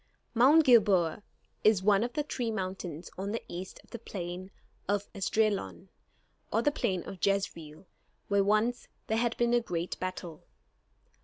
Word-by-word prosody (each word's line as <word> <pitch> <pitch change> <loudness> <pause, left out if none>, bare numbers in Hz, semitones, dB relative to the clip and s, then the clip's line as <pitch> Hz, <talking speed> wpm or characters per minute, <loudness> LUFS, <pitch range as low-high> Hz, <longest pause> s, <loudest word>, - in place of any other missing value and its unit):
Mount 280 +7 +6
Gilboa 200 -8 +4 0.4
is 210 -3 +4
one 205 +1 +4
of 240 0 -3
the 295 - 0
three 245 -5 -3
mountains 185 -5 -5
on 200 +2 -3
the 230 - -3
east 180 +2 -7
of - - -25
the 235 - -6
plain 185 -3 -6 0.4
of 205 0 0
Esdraelon, 200 - -1 0.6
or 225 +2 +1
the 290 - +3
plain 185 -10 -1
of 190 - -9
Jezreel, 170 -5 -1 0.4
where 200 -1 +3
once 215 +4 +1 0.2
there 220 +1 0
had 235 -1 0
been 240 0 +2
a 240 - +4
great 175 -5 -4
battle. 180 -3 -5
200 Hz, 155 wpm, -30 LUFS, 185-230 Hz, 0.6 s, Mount